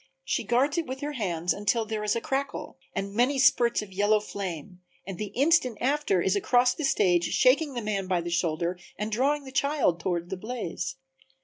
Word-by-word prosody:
She - - -1
guards 275 +7 +2
it 330 - -3
with 260 +1 -6
her 295 +1 -3
hands 180 - -1
until 210 +3 0
there 215 -1 -3
is 210 +1 +1
a 230 - -1
crackle 275 +3 -3 0.2
and 195 +1 -3
many 250 +6 +2
spurts 240 -4 +3
of 195 -2 -12
yellow 205 +2 +3
flame 180 -4 -6 0.2
and 190 -1 -7
the 210 - -2
instant 275 -4 +3
after 265 - +1
is 190 - +2
across 245 +5 +3
the 310 - -3
stage 175 -9 +3
shaking 275 - +3
the 240 - -3
man 200 -3 -2
by 180 -2 +1
the 170 0 -5
shoulder 170 +1 -1 0.2
and 210 +2 -3
drawing 280 +6 +1
the 265 - -10
child 280 - +1
toward 175 0 -2
the 190 - -3
blaze. 215 -2 -4
215 Hz, 200 wpm, -27 LUFS, 185-265 Hz, 0.2 s, spurts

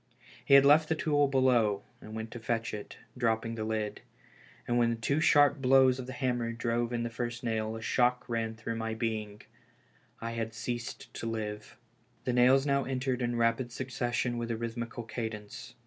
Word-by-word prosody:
He 140 - +6
had 140 0 +8
left 155 +2 +6
the 160 - +2
tool 145 -2 +2
below, 125 -7 +2 0.2
and 110 +1 -9
went 110 0 -5
to 120 - -7
fetch 115 0 -2
it, 105 -1 -7 0.2
dropping 115 -2 0
the 110 -1 -4
lid; 110 -1 -2 0.7
and 120 0 +2
when 115 -1 +2
two 140 +6 0
sharp 145 -2 +5
blows 130 0 +5
of 125 - -6
the 130 - -6
hammer 120 -4 -1
drove 115 0 -1
in 120 -1 -1
the 120 - -2
first 120 +1 -4
nail, 110 -1 -1
a 110 - -7
shock 125 +1 +1
ran 115 -2 -2
through 115 +1 -4
my 115 0 -3
being 110 -2 -3 0.4
— 125 -2 -35
I 115 0 -4
had 115 -1 -4
ceased 120 +1 -5
to 115 - -5
live. 105 -2 -5 0.5
The 125 - -1
nails 130 +3 +5
now 140 -1 +2
entered 130 -1 -2
in 120 0 0
rapid 115 +1 +1
succession 120 -1 -2
with 120 0 -3
a 115 - -1
rhythmical 115 +1 -4
cadence. 110 -2 -6
120 Hz, 190 wpm, -30 LUFS, 115-125 Hz, 0.7 s, had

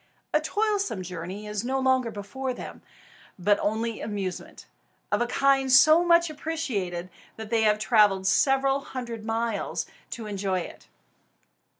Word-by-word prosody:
A 305 - +3
toilsome 405 - -1
journey 180 +3 -7
is 210 0 -3
no 265 +2 -1
longer 260 -2 +2
before 250 +6 -5
them; - - -9 0.6
but 200 +3 +2
only 225 +2 -2
amusement, 200 -4 -5 0.5
of - - +1
a 240 - +1
kind 270 +1 +2
so 310 +6 +7
much 340 0 +4
appreciated 240 - -4 0.2
that 220 0 -9
they 230 -1 +3
have 210 -1 +3
travelled 205 -2 +3
several 270 +5 +3
hundred 240 -5 -7
miles 225 -2 -2 0.2
to 230 - -6
enjoy 195 -3 -2
it. - - -10
230 Hz, 135 wpm, -26 LUFS, 205-270 Hz, 0.6 s, so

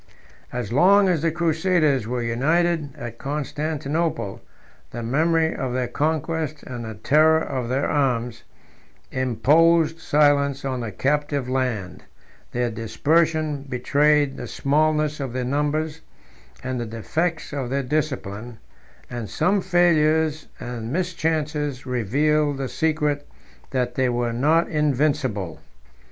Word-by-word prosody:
As 120 -3 -4
long 195 +7 +5
as 170 -5 +1
the 165 - +2
crusaders 160 - +1
were 120 0 -2
united 155 +6 +1
at 120 -1 -8
Constantinople, 150 - -2 0.5
the 120 - -6
memory 160 +6 +2
of 130 -2 -3
their 125 -1 -1
conquest, 155 +2 -2
and 120 -2 -6
the 110 -1 -6
terror 155 +8 +4
of 130 -6 -3
their 135 +3 0
arms, 125 -5 0 0.7
imposed 160 +6 +3
silence 145 -2 +2
on 130 -2 -2
the 115 -3 -4
captive 145 +3 0
land: 125 -8 -2 0.5
their 120 -1 -1
dispersion 150 +7 +1
betrayed 145 +3 +2
the - - -6
smallness 150 +1 +1
of 135 -4 -4
their 130 -1 -2
numbers 150 +3 -1 0.6
and 130 -1 -3
the 120 - -4
defects 155 +10 -2
of 135 -4 -3
their 140 +1 -1
discipline; 120 -6 -3 0.5
and 120 -3 -6
some 195 +2 +1
failures 160 -3 +2
and 120 -1 -5
mischances 155 -5 -1
revealed 145 +5 +1
the 135 -1 -3
secret, 150 -2 0 0.4
that 125 -2 -1
they 130 0 +1
were 120 -1 -1
not 155 +8 +3
invincible. 140 - 0
145 Hz, 120 wpm, -23 LUFS, 125-155 Hz, 0.7 s, long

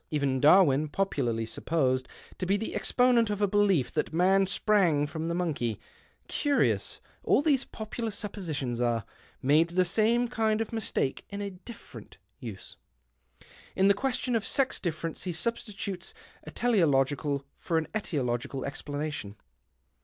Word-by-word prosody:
Even 140 -3 0
Darwin 150 -1 +5
— - - -14
popularly 130 -11 -1
supposed 130 +1 0 0.3
to 185 - -2
be 200 +2 +3
the 220 - -4
exponent 245 -3 +3
of 205 -1 -2
a 205 - +3
belief 195 -9 +2
that - - -1
man 190 +4 +3
sprang 185 -8 +2
from 160 +2 -4
the 170 - -1
monkey 145 - -1 0.2
— - - -35
curious 290 -1 +1 0.2
all - - +3
these 280 -4 +2
popular 220 +1 -5
suppositions 160 - -3
are 120 -2 0 0.2
— - - -28
made 150 +5 +4
the 180 +1 +2
same 230 +6 +2
kind 220 -2 0
of 225 0 -3
mistake 215 -11 -1
in 200 - -6
a 200 -1 -4
different 180 - -12 0.2
use. 110 -8 -9 1.0
In 195 +1 +4
the - - +7
question 250 +2 -1
of 225 - +1
sex 270 +2 +1
difference 165 -1 -4
he 180 - -1
substitutes 195 -1 -4 0.3
a - - -7
teleological 145 - +1
for 165 - -1
an 160 - 0
etiological 135 - -2
explanation." 145 -6 -4
175 Hz, 150 wpm, -28 LUFS, 140-210 Hz, 1.0 s, the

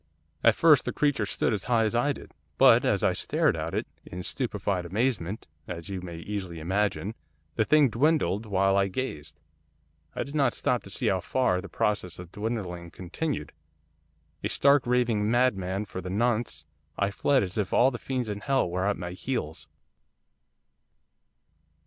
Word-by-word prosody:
'At - - +6
first - - +5
the - - -1
creature 145 -8 +1
stood 110 - +1
as 100 - -2
high 120 -2 +3
as 110 - 0
I 120 +5 +2
did. - - -8 0.3
But, - - +7
as - - +1
I - - +3
stared - - +1
at - - -4
it, - - -1 0.2
in 90 +1 -7
stupefied 100 -6 -2
amazement, 105 0 -1 0.2
as 85 -1 -6
you 95 -2 -4
may 85 -2 -7
easily 90 -2 -5
imagine, 100 +4 -1 0.4
the 110 - +2
thing 150 +1 +5
dwindled 115 - +1
while 95 -1 +2
I 100 0 +3
gazed. 75 - -5 0.8
I - - -1
did 140 - -10
not 145 -3 +2
stop 125 - 0
to - - -10
see - - -3
how 95 - +2
far 90 -1 +1
the 100 - -10
process 90 -2 -1
of 90 -1 -10
dwindling 100 -6 -4
continued, 90 - -4 0.9
a 105 - 0
stark 140 +1 +4
raving 120 -4 +2
madman 105 -5 +1
for 95 - -6
the 90 - -6
nonce, 110 -5 0 0.3
I 100 0 +1
fled 135 +5 +2
as 95 +3 -3
if 100 - -1
all 130 +2 +4
the 120 - -6
fiends 130 -3 -3
in 105 -1 -4
hell 135 +1 +1
were 90 +3 -1
at 105 - 0
my 90 -1 -5
heels. 90 -5 -4
105 Hz, 175 wpm, -27 LUFS, 90-120 Hz, 0.9 s, But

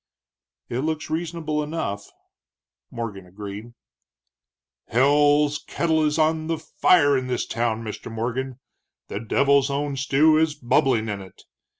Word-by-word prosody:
"It 120 - -3
looks 155 +2 -3
reasonable 160 -2 -2
enough," 150 -10 -4 0.8
Morgan 105 -6 -6
agreed. 105 +4 -8 1.1
"Hell's 145 +3 +3
kettle 160 -2 +1
is 150 0 +1
on 155 0 +1
the 165 0 -1
fire 155 -2 +3
in 130 -1 -1
this 125 -1 -1
town, 115 -1 -1
Mr. 110 +1 -7
Morgan; 125 +3 -3 0.5
the 100 - -4
devil's 140 +5 +2
own 140 0 -2
stew 150 +4 +4
is 160 -1 +1
bubbling 125 -4 +1
in 100 -2 -4
it. 95 -1 -14
140 Hz, 125 wpm, -24 LUFS, 115-155 Hz, 1.1 s, stew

